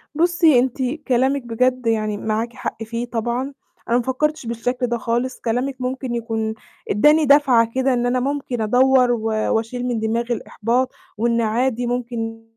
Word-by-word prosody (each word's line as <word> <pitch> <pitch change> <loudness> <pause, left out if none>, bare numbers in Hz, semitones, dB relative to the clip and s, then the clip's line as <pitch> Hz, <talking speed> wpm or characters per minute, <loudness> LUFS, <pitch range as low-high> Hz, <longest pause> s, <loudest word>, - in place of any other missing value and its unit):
بُصّي 330 -4 +4
أنتِ 255 +1 -1 0.3
كلامِك 265 +2 +2
بجد 250 +1 0
يعني 215 -2 0
معاكِ 220 +3 -2
حق 225 - -5
فيه 230 +2 -4
طبعًا، 240 +3 -3 0.4
أنا 235 - +4
ما 245 - 0
فكّرتش 300 +3 -1
بالشكل 245 +2 -2
ده 235 0 -1
خالص، 240 +3 -2
كلامِك 250 +4 -1
ممكن 255 -1 -3
يكون 225 -2 -2 0.4
ادّاني 300 +9 +4
دَفعة 265 -5 +4
كده 260 0 +2
إن 240 -1 0
أنا 250 +1 +1
ممكن 265 -2 -2
أدوّر، 250 +3 +4
و 235 -2 -1 0.3
وأشيل 230 +3 -2
من 240 -2 -1
دماغي 230 +2 -1
الإحباط 240 +4 -1 0.3
وإن 235 +1 +1
عادي 240 +2 0
ممكن 230 -2 -3
245 Hz, 160 wpm, -21 LUFS, 230-260 Hz, 0.4 s, بُصّي